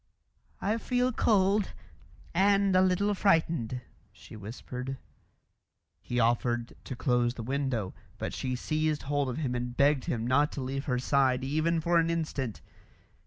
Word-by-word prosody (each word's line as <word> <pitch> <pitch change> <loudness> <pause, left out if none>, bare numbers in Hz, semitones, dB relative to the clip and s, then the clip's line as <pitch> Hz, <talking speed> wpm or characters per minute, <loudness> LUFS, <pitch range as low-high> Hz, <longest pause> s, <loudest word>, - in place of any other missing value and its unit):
"I 215 +3 0
feel 250 +2 +1
cold 200 -3 +2 0.6
and 195 +1 +3
a 185 - +6
little 190 +2 +2
frightened," 165 - +1 0.3
she - - -13
whispered. 125 +5 -6 1.0
He 120 - -2
offered 120 0 +1
to 130 - -5
close 120 -1 +1
the 115 - -6
window, 130 -6 -2 0.2
but - - -4
she 130 -1 -2
seized 155 +3 -1
hold 145 -1 0
of 125 - -4
him 140 -6 -1
and 125 0 -4
begged 140 -1 +3
him 115 -1 -2
not 145 +4 +3
to 140 - -4
leave 135 +2 -3
her 125 -2 0
side 130 0 +2
even 155 +4 +1
for 170 +1 +3
an 165 0 +1
instant. 150 -8 -2
140 Hz, 150 wpm, -29 LUFS, 125-170 Hz, 1.0 s, a